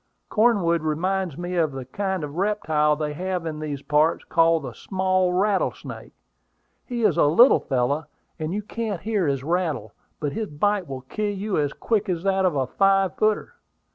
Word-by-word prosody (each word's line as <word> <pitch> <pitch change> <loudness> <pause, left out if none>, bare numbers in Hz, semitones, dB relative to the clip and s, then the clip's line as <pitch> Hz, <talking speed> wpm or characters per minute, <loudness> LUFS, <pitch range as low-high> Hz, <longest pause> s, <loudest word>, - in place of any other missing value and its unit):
Cornwood 200 -8 +3
reminds 175 +2 -1
me 175 +1 -4
of 155 -5 +1
a 130 -1 -5
kind 190 +5 -3
of 145 -1 -5
reptile 155 -6 +1
they 150 0 -3
have 180 +1 -3
in 155 -2 -4
these 145 -3 -5
parts, 150 +2 +2
called 165 -1 +3
the 125 -3 -6
small 185 - 0
rattlesnake. 195 +2 -1 0.7
He 240 -2 -3
is - - +3
a - - +5
little 235 - +6
fellow, 140 +3 -1 0.3
and 155 +1 -3
you 210 +3 -2
can't 215 -3 -4
hear 210 -5 0
his 135 -2 -1
rattle; 155 - -1 0.3
but 145 -2 -2
his 220 -1 -3
bite 195 +5 0
will 135 -1 -6
kill 210 +11 -3
you 200 +1 -2
as 145 -2 0
quick 215 +3 -1
as 175 -2 -1
that 195 -1 +2
of 175 -5 +1
a 135 -2 +1
five 195 +4 +2
footer. 215 - 0
175 Hz, 180 wpm, -24 LUFS, 150-195 Hz, 0.7 s, little